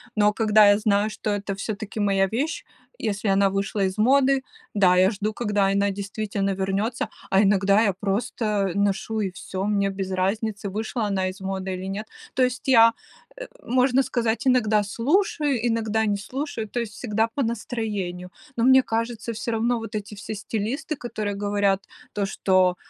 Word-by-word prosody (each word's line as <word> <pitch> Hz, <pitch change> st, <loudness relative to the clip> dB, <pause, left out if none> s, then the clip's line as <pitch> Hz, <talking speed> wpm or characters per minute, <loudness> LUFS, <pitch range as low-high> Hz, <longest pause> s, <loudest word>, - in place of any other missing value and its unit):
Но 210 Hz, -1 st, +4 dB
когда 215 Hz, -1 st, +5 dB
я 205 Hz, -, +5 dB
знаю, 210 Hz, -1 st, +2 dB
что 215 Hz, -, -4 dB
это 200 Hz, -1 st, -2 dB
всё-таки 215 Hz, +1 st, -5 dB
моя 195 Hz, -1 st, +2 dB
вещь, 270 Hz, -, -2 dB, 0.3 s
если 210 Hz, -1 st, -2 dB
она 195 Hz, 0 st, +4 dB
вышла 195 Hz, +1 st, -1 dB
из 190 Hz, +1 st, -1 dB
моды, 270 Hz, +4 st, +4 dB, 0.3 s
да, 190 Hz, -3 st, +4 dB
я 185 Hz, +3 st, +4 dB
жду, 210 Hz, +1 st, -3 dB
когда 205 Hz, -3 st, 0 dB
она 200 Hz, +1 st, +2 dB
действительно 200 Hz, 0 st, -3 dB
вернется, 195 Hz, +5 st, -1 dB, 0.2 s
а 195 Hz, -, +4 dB
иногда 200 Hz, +1 st, +4 dB
я 210 Hz, -, +3 dB
просто 205 Hz, 0 st, -1 dB
ношу 200 Hz, +2 st, 0 dB
и 195 Hz, -3 st, -1 dB
всё, 190 Hz, +1 st, -5 dB
мне 200 Hz, -1 st, +1 dB
без 195 Hz, -1 st, -4 dB
разницы, 200 Hz, +2 st, -1 dB
вышла 220 Hz, +3 st, -2 dB
она 190 Hz, -2 st, 0 dB
из 185 Hz, +2 st, -7 dB
моды 190 Hz, 0 st, -3 dB
или 185 Hz, +1 st, -5 dB
нет. 205 Hz, +3 st, -4 dB, 0.3 s
То 255 Hz, -, +3 dB
есть 250 Hz, +1 st, -1 dB
я, 230 Hz, -3 st, +7 dB, 0.4 s
э, -, -, -7 dB, 0.2 s
можно 255 Hz, +2 st, +3 dB
сказать, 240 Hz, +1 st, -1 dB
иногда 220 Hz, -5 st, +3 dB
слушаю, 275 Hz, -, +1 dB
иногда 220 Hz, -1 st, 0 dB
не 205 Hz, -, +1 dB
слушаю, 235 Hz, 0 st, -5 dB
то 240 Hz, -, -2 dB
есть 225 Hz, -3 st, -4 dB
всегда 225 Hz, -1 st, 0 dB
по 255 Hz, +4 st, -2 dB
настроению. 210 Hz, -6 st, -3 dB, 0.3 s
Но 230 Hz, -, +1 dB
мне 260 Hz, +1 st, +7 dB
кажется, 230 Hz, 0 st, -3 dB
всё 225 Hz, +2 st, -4 dB
равно 230 Hz, +2 st, +1 dB
вот 225 Hz, 0 st, -7 dB
эти 210 Hz, 0 st, -5 dB
все 205 Hz, +2 st, -6 dB
стилисты, 230 Hz, +9 st, -3 dB
которые 215 Hz, -6 st, -4 dB
говорят 205 Hz, -1 st, +1 dB, 0.3 s
то, 205 Hz, -1 st, -1 dB
что 185 Hz, -2 st, +2 dB
210 Hz, 175 wpm, -24 LUFS, 195-230 Hz, 0.4 s, я